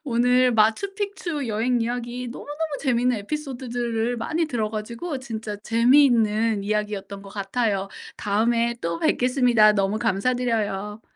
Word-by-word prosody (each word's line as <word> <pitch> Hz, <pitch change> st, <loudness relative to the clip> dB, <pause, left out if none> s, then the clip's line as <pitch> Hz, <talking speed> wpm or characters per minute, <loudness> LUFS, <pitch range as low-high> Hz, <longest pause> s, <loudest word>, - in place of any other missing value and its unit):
오늘 250 Hz, 0 st, +3 dB
마추픽추 340 Hz, -, 0 dB
여행 235 Hz, +3 st, +1 dB
이야기 240 Hz, +1 st, -3 dB
너무너무 290 Hz, +4 st, -8 dB, 0.2 s
재밌는 250 Hz, -2 st, +1 dB
에피소드들을 245 Hz, -2 st, -3 dB
많이 315 Hz, +8 st, -1 dB
들어 225 Hz, -7 st, -2 dB
가지고 235 Hz, +8 st, -5 dB
진짜 225 Hz, -4 st, -6 dB
재미있는 230 Hz, -2 st, +3 dB
이야기였던 205 Hz, -1 st, -3 dB
것 195 Hz, -, -12 dB
같아요. 200 Hz, 0 st, -1 dB, 0.3 s
다음에 230 Hz, +3 st, +1 dB
또 170 Hz, 0 st, -2 dB
뵙겠습니다. 245 Hz, -3 st, +4 dB
너무 200 Hz, +1 st, 0 dB
감사드려요. 210 Hz, -1 st, -1 dB
235 Hz, 335 characters per minute, -24 LUFS, 210-250 Hz, 0.3 s, 뵙겠습니다